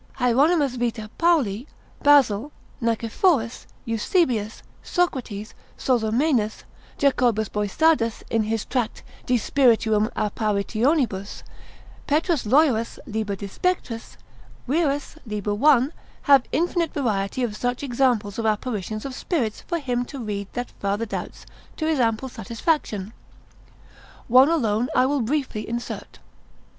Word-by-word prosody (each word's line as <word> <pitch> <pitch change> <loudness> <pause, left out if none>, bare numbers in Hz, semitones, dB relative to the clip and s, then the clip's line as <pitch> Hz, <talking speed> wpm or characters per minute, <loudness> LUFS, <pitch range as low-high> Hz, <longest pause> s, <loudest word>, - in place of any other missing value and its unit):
Hieronymus 275 +2 +3
vita 230 -3 -2
Pauli, 280 - +2 0.3
Basil 280 -3 +4 0.3
ser. - - -9
40, 230 0 0
Nicephorus, 235 - +1 0.2
Eusebius, 225 - 0 0.2
Socrates, 245 - -2 0.2
Sozomenus, 235 -1 +1 0.3
Jacobus 240 -6 +2
Boissardus 230 +3 +1
in 225 - +2
his 220 0 -2
tract 245 -4 -2 0.2
de 250 - +3
spirituum 225 -4 +3
apparitionibus, 215 +1 0 0.6
Petrus 310 - +1
Loyerus 250 -3 +3
l. 225 - -10 0.2
de 200 +1 -7
spectris, 230 - -3 0.5
Wierus 290 +1 0
l. 210 0 -2
1. 275 +3 +4 0.3
have 275 -3 +6
infinite 340 0 0
variety 220 -3 -1
of 220 -4 -2
such 245 +4 -2
examples 240 -6 0
of 225 - -2
apparitions 215 -1 -2
of 270 - -5
spirits, 255 - -2
for 340 - -1
him 250 -5 -1
to 275 - -9
read 205 -5 -4
that 245 0 -4
farther 200 +3 -1
doubts, 210 - -6 0.3
to 315 - -2
his 315 -3 +1
ample 230 +1 +1
satisfaction. 230 - -2 1.1
One 255 +4 +7
alone 240 -7 +1
I 255 - +5
will 280 0 +1
briefly 250 -3 -2
insert. 235 +1 -5
240 Hz, 120 wpm, -24 LUFS, 215-285 Hz, 1.1 s, One